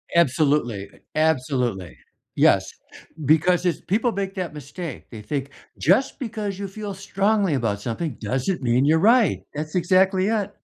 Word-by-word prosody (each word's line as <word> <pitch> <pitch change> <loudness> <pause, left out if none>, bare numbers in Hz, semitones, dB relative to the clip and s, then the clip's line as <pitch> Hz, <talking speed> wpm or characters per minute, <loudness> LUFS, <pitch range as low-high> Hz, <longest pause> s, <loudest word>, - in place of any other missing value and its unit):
Absolutely. 140 -9 +2 0.3
Absolutely. 130 - 0 0.4
Yes. - - +4 0.6
Because 160 +5 +3
it's 175 - 0
people 225 +5 0
make 195 -1 -4
that 175 -5 -4
mistake, 150 +2 -8
they 110 -3 -9
think 140 +4 -3 0.3
just 195 - +2
because 215 -6 -4
you 200 - -3
feel 205 0 -6
strongly 195 -2 0
about 105 -5 -1
something 125 +5 -3
doesn't 130 - -1
mean 125 +2 +2
you're 160 +2 +4
right, 230 +3 +4
that's 155 +2 -5
exactly 185 +2 +3
it. 205 -2 -1
165 Hz, 140 wpm, -23 LUFS, 135-195 Hz, 0.6 s, Yes